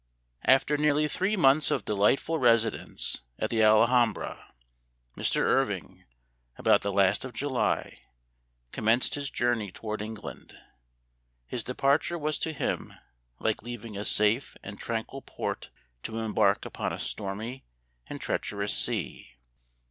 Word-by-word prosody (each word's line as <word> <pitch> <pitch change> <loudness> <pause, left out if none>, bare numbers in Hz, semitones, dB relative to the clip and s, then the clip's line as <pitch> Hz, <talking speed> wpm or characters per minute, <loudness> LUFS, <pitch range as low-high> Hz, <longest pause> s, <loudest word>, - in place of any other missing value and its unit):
AFTER 135 +3 +4
nearly 150 0 +2
three 190 +7 0
months 145 -2 +4
of 125 - -1
delightful 105 +10 +2
residence 115 - +1 0.2
at - - -2
the 115 -1 +2
Alhambra, 115 +2 +3 0.6
Mr. - - +1
Irving, - - 0 0.5
about - - +4
the 100 - -2
last 100 0 +3
of 130 -1 -7
July, 135 0 -1 0.7
commenced 115 +3 +2
his 140 -1 -2
journey 120 -5 0
toward 110 +2 -5
England. 110 +1 -8 0.9
His 120 - -4
departure 140 +6 +1
was 155 -2 -2
to 160 - -1
him 150 - -3 0.4
like 110 - -1
leaving 115 -2 -8
a 100 - -4
safe 105 +5 +2
and 100 0 -9
tranquil 115 +4 -4
port - - -5 0.3
to 110 - -6
embark 105 -2 +1
upon - - -3
a - - -4
stormy 110 +6 -4 0.4
and - - -7
treacherous 100 0 -2
sea. 65 - 0
115 Hz, 125 wpm, -28 LUFS, 105-135 Hz, 0.9 s, AFTER